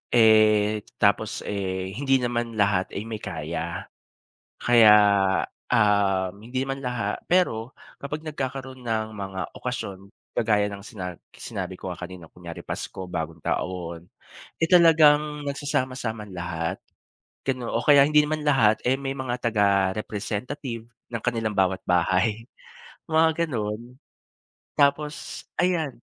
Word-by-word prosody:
eh, 110 -2 +5 0.2
tapos, 100 +1 +2
eh, 95 -2 -3
hindi 135 +2 +2
naman 120 -1 -2
lahat 100 -3 +2
ay 105 - -3
may 110 -1 -6
kaya. - - -4 0.8
Kaya, 115 -3 +7 0.8
um, 100 -4 +3
hindi 125 +4 -4
naman 135 0 -3
laha 120 -5 -2
pero 130 -10 +1 0.3
kapag 150 +2 -5
nagkakaroon 130 -4 -5
ng 110 -1 0
mga 95 -1 -4 0.2
okasyon, 110 -6 -4 0.4
kagaya 105 -3 +3
ng 100 0 -8
sina 95 -6 -6 0.2
sinabi 100 -7 -6
ko 95 - -6
nga - - -13
kanina 90 -2 -10
kunyari 85 -2 -9
Pasko, 95 - -5
Bagong 80 -2 -4
taon, 85 -2 -3 0.6
eh, 165 - +3
talagang 150 -4 +5
nagsasama-sama 130 -5 -2
lahat, 85 -2 -3 0.7
gano 130 -3 -2
o 115 - +1
kaya 145 -2 +7
hindi 150 0 +5
naman 155 0 -2
lahat, 115 -7 +4
eh, 130 - +3
may 135 -1 -2
mga 125 -2 -2
taga-representative 110 +4 -1 0.3
ng 115 -2 -3
kanilang 115 -3 0
bawat 95 -1 +2
bahay 95 +5 +1 0.7
mga 160 +1 +3
gano'n. 115 0 -4 0.8
Tapos 145 +1 0 0.2
ayan. 170 -6 0
115 Hz, 120 wpm, -25 LUFS, 100-135 Hz, 0.8 s, Kaya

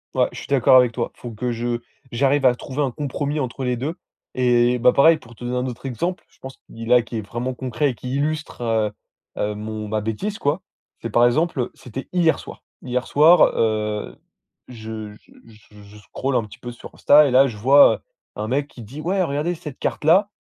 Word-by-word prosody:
Ouais, - - +3
je - - -8
suis - - -10
d'accord 130 -1 +5
avec 125 -2 +4
toi. 115 0 -3
Faut 120 - -8
que 120 +3 -3
je 120 0 -2 0.3
j'arrive 135 +3 +2
à 125 -1 +5
trouver 135 +3 -5
un 140 - +1
compromis 145 +2 -3
entre 130 0 -4
les 125 -1 -1
2 145 +7 -3 0.4
et 125 -1 +2
bah 125 +1 +5
pareil, 160 +5 +5
pour 120 -6 -16
te 120 - -12
donner 125 +1 -2
un 125 - -1
autre 125 +1 -8
exemple, 170 +9 -3
je - - -28
pense 130 0 -10
qui, 115 0 -11
là, 125 +1 +5
qui 115 - -6
est - - -2
vraiment 120 +5 -4
concret 130 +2 -1
et - - -10
qui 125 +4 -5
illustre, 155 0 -3
heu, 110 -2 0 0.5
heu, 105 0 -1
mon 110 0 -6
ma 105 0 -2
bêtise 110 - -4
quoi. 145 +6 0 0.4
C'est 115 - -5
par 120 +3 +4
exemple, 155 +4 0
heu, 125 - -1
c'était 130 +1 -8
hier 175 -3 +2
soir. - - -11 0.2
Hier 125 0 -2
soir, 160 +4 +6
heu, 105 -1 -1 0.5
je 110 -3 -8
je 105 - -21 0.4
je 105 0 -15
je 100 +1 -15
scrolle 130 +5 -4
un 115 - +2
petit 105 - -13
peu 120 - -7
sur 120 - -12
Insta 150 +1 +6
et - - -1
là, 135 +2 +6
je 115 -5 -7
vois, 135 +7 +6
heu, - - -25 0.4
un 105 - -4
mec 140 +4 -1
qui 125 - -13
dit: 125 +8 -9
«Ouais, 185 +4 0
regardez 150 +2 -1
cette 150 -5 -9
carte - - -3
là, 185 +7 +4
125 Hz, 225 wpm, -22 LUFS, 115-145 Hz, 0.5 s, soir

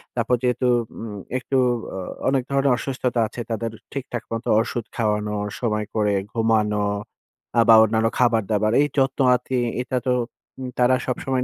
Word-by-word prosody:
তারপর 120 +1 +2
যেহেতু 125 0 +1 0.3
উম 105 -3 -6 0.2
একটু 135 +1 -1 0.4
আ - - -4 0.3
অনেক 135 -2 +1
ধরনের 140 0 +3
অসুস্থতা 125 -2 -2
আছে। 120 - -7
তাদের 115 0 -2 0.2
ঠিকঠাক 130 -4 -4
মতো 115 +1 -4
ওষুধ 115 0 -3
খাওয়ানো, 105 -2 0 0.2
সময় 105 -3 -1
করে 105 -2 +2 0.2
ঘুমানো 105 -2 +1 0.7
আ - - +8
বা 115 - +10
অন্যান্য 110 +1 +2
খাবার-দাবার, 110 -3 +2
এই 145 - +3
যত্ন-আতি, 130 -1 +2 0.2
এটা 125 0 -2
তো 125 - +3 0.5
উম 130 - -4
তারা 125 +1 +5
সবসময় 130 0 -1
120 Hz, 145 wpm, -23 LUFS, 110-130 Hz, 0.7 s, বা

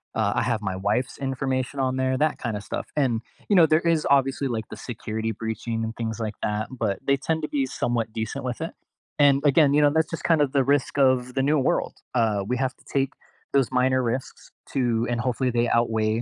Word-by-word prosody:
uh, - - +1
I - - +2
have 115 -3 0
my 95 -2 -3
wife's 105 +7 -1
information 135 0 -2
on 130 0 0
there, 130 0 +1
that 155 +1 +1
kinda 110 -4 -3
stuff. - - -5
And, 125 -6 +1 0.3
you 205 - +4
know, 170 - +8
there 155 +1 +3
is 165 -2 +1
obviously, 135 0 +2
like, 110 -3 -3
the - - -8
security 110 -2 -4
breaching, 115 +1 -3
and 110 0 -3
things 110 -1 -3
like 110 -1 -3
that, 105 +1 -1
but 110 -6 -2
they 140 0 +4
tend 160 +3 -1
to - - -2
be 140 -2 0
somewhat 120 -3 -2
decent 110 +2 -4
with 125 +4 -4
it. 165 - -3 0.5
And, 140 -1 +5
again, 145 0 +5
you 150 - +4
know, 145 - +6
that's 160 +1 +1
just 165 - -5
kinda 155 -4 +4
the 135 0 +1
risk 140 +1 +1
of 130 -2 +3
the 135 - +1
new 150 +1 +3
world, 130 - 0 0.2
uh, 110 -4 +2
we 125 - 0
have 130 -1 -1
to - - -24
take 135 -1 +1 0.4
those 135 -3 +3
minor 130 0 +2
risks 125 +2 -4 0.2
to, 120 -3 +1
and 120 -1 -1
hopefully 125 +1 0
they 120 0 +1
outweigh 110 -1 +1
130 Hz, 220 wpm, -25 LUFS, 115-140 Hz, 0.5 s, know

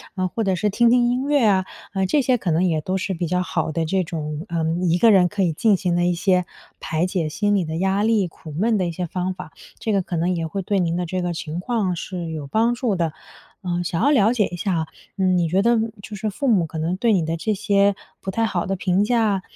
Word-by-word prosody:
呃， 185 -2 0
或 225 +4 -2
者 190 -1 +2
是 210 +4 0
听 235 +4 +3
听 240 0 +4
音 255 +3 -1
乐 290 -3 +3
啊。 190 -3 +3 0.3
呃， 190 -1 +1
这 285 +10 +2
些 255 -1 +2
可 190 - -3
能 165 +2 +2
也 165 -4 +1
都 185 +5 -2
是 190 +1 -2
比 175 -1 -2
较 180 +2 0
好 160 -2 -2
的 165 - 0
这 185 +3 0
种， 155 -1 -5
呃， 170 -1 -2 0.2
1 170 +1 +3
个 225 +4 +6
人 185 -3 +5
可 200 +1 -1
以 175 - +2
进 205 +7 +3
行 180 -2 0
的 175 - +2
一 180 - +2
些 180 0 +2 0.3
排 160 +2 -1
解 180 -3 -1
心 205 +7 0
理 190 -4 +1
的 160 0 -4
压 190 +4 +1
力、 220 -3 +3
苦 160 -1 -12
闷 215 +8 +1
的 185 -3 0
一 - - -2
些 180 +2 -3
方 180 +2 -2
法， 180 -3 -10 0.3
这 220 - -2
个 200 -2 +2
可 180 -1 -5
能 170 +2 +1
也 165 -2 -2
会 195 +5 -4
对 195 +2 0
您 170 -2 0
的 180 0 -1
这 185 +2 -2
个 175 -1 -2
情 160 0 -5
况 205 -2 -1
是 175 -2 -5
有 150 -3 -5
帮 225 +9 +2
助 240 -4 -1
的。 170 -3 0 0.6
呃， 175 0 -1
想 170 -1 -2
要 285 - +4
了 225 -5 +4
解 225 -5 +2
一 175 - -6
下 180 +1 -1
啊， 160 -1 -1 0.3
嗯， 185 -2 +2
你 170 -2 +1
觉 190 +4 +2
得， 235 +1 +4
嗯， 225 0 0
就 210 - -7
是 215 +2 -2
父 270 +7 -3
母 195 -9 +3
可 160 - -7
能 165 +3 -1
对 230 +2 +2
你 175 -5 +2
的 165 +1 -1
这 210 +6 -1
些 200 -1 +2 0.3
不 - - -5
太 225 +4 0
好 180 -6 -2
的 195 - -1
评 185 +1 +1
价 215 -4 +1
185 Hz, 290 characters per minute, -22 LUFS, 170-210 Hz, 0.6 s, 个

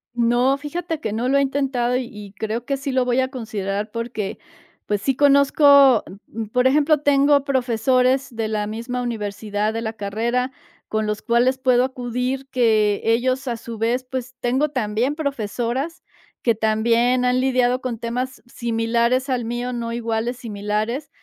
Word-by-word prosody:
No, 240 +3 +3
fíjate 325 +2 -4
que 215 - -3
no 230 +3 -1
lo 275 +2 +3
he - - +3
intentado 265 -3 0
y 255 - -1
y 205 -2 -10
creo 220 +3 -3
que 275 +1 -1
sí 275 0 -4
lo 260 -1 +2
voy 245 +1 +1
a 260 - -1
considerar 210 -5 -4
porque, 230 -3 -4 0.5
pues, 205 -1 -1
sí, 270 +4 0
conozco, 280 +1 +4 0.4
am, 195 - -12
mm, 225 0 -5
por 250 +2 +3
ejemplo, 300 +2 +3
tengo 285 0 +4
profesores 255 0 +1
de 225 -1 -1
la 210 -1 -2
misma 235 +3 -4
universidad 210 -2 -2
de 225 - -3
la 220 -1 -3
carrera 230 +5 -1 0.4
con 215 0 -1
los 210 0 -3
cuales 245 +2 +2
puedo 255 -1 +3
acudir 255 +1 -3
que 220 -5 +2
ellos 255 +4 +1
a 235 -2 -2
su 230 -1 -8
vez, 235 +3 0
pues, 255 -1 -6
tengo 260 +5 +1
también 245 +1 -1
profesoras 270 - -3 0.4
que 235 - +3
también 230 +3 +2
han 250 0 +2
lidiado 255 -1 +2
con 245 -3 -3
temas 250 +3 -4
similares 235 +2 0
al 250 -3 -1
mío, 240 +2 -3
no 230 -1 -3
iguales, 235 +1 -2
similares, 215 +5 -3
245 Hz, 165 wpm, -22 LUFS, 225-260 Hz, 0.5 s, conozco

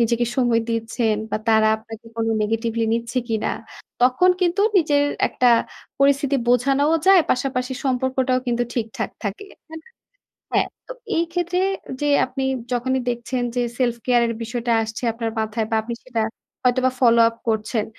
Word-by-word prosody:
নিজেকে 235 +1 +2
সময় 240 -3 +3
দিচ্ছেন 225 -1 0
বা - - 0
তারা 220 -1 +5
আপনাকে 225 +1 -12
কোনো 225 0 0
negatively 225 +1 -1
নিচ্ছে 235 +2 -1
কিনা। 220 -1 -1 0.5
তখন 255 +9 +4
কিন্তু 360 +2 +1 0.2
নিজের 295 -5 +3 0.2
একটা 250 - 0 0.5
পরিস্থিতি 280 0 +3
বোঝানোও 275 +5 +3
যায়, 385 -2 +8
পাশাপাশি 255 0 -1
সম্পর্কটাও 260 0 +1
কিন্তু 240 0 +1
ঠিকঠাক 225 -2 -3
থাকে 205 - -4 0.2
হ্যাঁ 320 0 -9 0.7
হ্যাঁ - - +3 0.2
তো - - -6 0.2
এই 335 - +2
ক্ষেত্রে 355 +1 -1 0.4
যে 295 - 0 0.2
আপনি 265 +1 -4 0.3
যখনই 260 +2 0
দেখছেন 245 +1 -3
যে 245 - +2 0.2
সেলফ 240 -2 +1
কেয়ার 240 -1 +4
এর 230 - -2
বিষয়টা 235 +1 -2
আসছে 220 +2 -6
আপনার 230 0 -3
মাথায়। 220 0 -2
বা - - 0
আপনি 235 +1 -5
সেটা 240 -3 -2 0.4
হয়তোবা 255 +1 +2
follow 235 -2 +6
up 230 - -10
করছেন। 220 0 0
245 Hz, 155 wpm, -22 LUFS, 230-265 Hz, 0.7 s, যায়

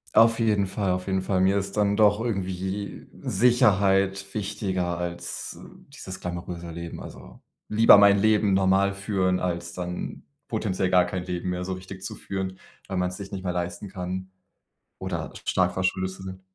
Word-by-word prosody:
Auf 115 0 +6
jeden 105 -4 +2
Fall, 95 -1 -1
auf 90 +1 -2
jeden 95 -1 0
Fall. 95 -1 +1
Mir 95 +1 +4
ist 100 0 -3
dann 100 0 +2
doch 105 -1 +5
irgendwie 95 -2 -3 0.2
Sicherheit 100 -3 +3
wichtiger 95 -4 -1
als, 85 0 -5
äh, - - -11 0.2
dieses 95 0 -8
glamouröse 85 -1 -5
Leben. 85 0 -7
Also, - - -11 0.3
lieber 110 -1 +7
mein 100 0 +6
Leben 105 -1 +3
normal 95 +1 +3
führen, 95 -2 0
als 85 -1 -3
dann 90 0 -5 0.2
potenziell 95 -4 -1
gar 90 -1 +5
kein 90 0 -3
Leben 90 0 -3
mehr 90 0 -2
so 95 - -2
richtig 95 +1 -9
zu - - -4
führen, 95 -1 -5 0.3
weil 95 - -3
man's 90 0 -1
sich 100 -1 -8
nicht 95 -1 -5
mehr 90 -1 -1
leisten 90 +3 -4
kann 95 0 -5 0.7
oder 90 -4 -4
sch - - -11
stark - - +2
verschuldet 95 0 0
zu 95 0 -10
sein. 95 0 -7
95 Hz, 175 wpm, -26 LUFS, 90-100 Hz, 0.7 s, lieber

